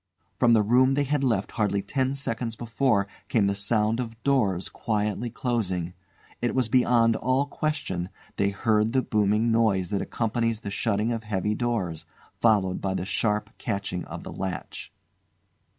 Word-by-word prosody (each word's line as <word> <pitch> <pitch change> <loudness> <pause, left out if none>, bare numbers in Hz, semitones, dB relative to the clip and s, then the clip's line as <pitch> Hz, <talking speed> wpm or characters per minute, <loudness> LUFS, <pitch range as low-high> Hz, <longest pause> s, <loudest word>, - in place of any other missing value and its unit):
From 120 -2 +5
the 110 -2 +5
room 130 +5 +4
they 145 - +2
had 145 0 0
left 110 -7 +1
hardly 100 -2 0
ten 130 +5 -1
seconds 115 -4 -3
before 115 -2 +1 0.2
came 110 -4 +3
the 100 - +2
sound 105 +3 0
of 115 -2 -5
doors 105 -10 +2
quietly 105 +1 -2
closing. 95 -8 -2 0.5
It 120 - 0
was 125 -4 +1
beyond 120 -2 +4
all 130 +3 +1
question; 145 - -2 0.3
they 100 - +2
heard 110 +2 +1
the 130 -1 +2
booming 105 +1 +2
noise 110 -5 +2
that 100 - 0
accompanies 115 -1 -1
the 100 - -5
shutting 105 +2 0
of 115 -1 -3
heavy 105 -1 -1
doors, 105 -9 -2 0.3
followed 100 -5 +2
by 95 -1 -1
the 90 - -2
sharp 105 +1 0
catching 100 -4 -3
of - - -8
the - - -7
latch. 95 -3 -5
110 Hz, 160 wpm, -26 LUFS, 100-120 Hz, 0.5 s, From